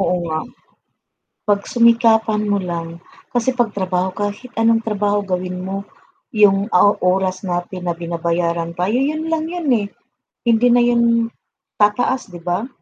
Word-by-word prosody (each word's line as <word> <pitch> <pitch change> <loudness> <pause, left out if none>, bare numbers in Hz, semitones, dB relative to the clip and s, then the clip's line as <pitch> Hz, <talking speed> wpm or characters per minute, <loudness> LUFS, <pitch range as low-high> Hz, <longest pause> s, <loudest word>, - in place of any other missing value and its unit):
Oo 180 -1 +1
nga, 155 -1 -2 1.1
pagsumikapan 225 0 +3
mo 205 - +2
lang 170 0 -5 0.3
kasi 245 +1 +2
'pag 240 -4 -1
trabaho, 185 -1 -1
kahit 205 +4 -4
anong 225 0 +2
trabaho 205 -1 +1
gawin 180 -1 -3
mo 195 +1 -3 0.5
yung 205 0 +3
o 180 +3 +5
oras 185 +1 +1
natin 175 +1 -4
na - - -1
binabayaran 170 0 -2
tayo, 185 +5 0
yun 305 +5 0
lang 320 -1 0
yun, 350 -2 -4
eh, 210 -3 0 0.6
hindi 235 +1 +4
na 245 0 +5
yun 240 0 +3 0.8
tataas, 230 +5 +2
'di 175 - -9
ba? 180 +7 -1
205 Hz, 140 wpm, -19 LUFS, 180-230 Hz, 1.1 s, o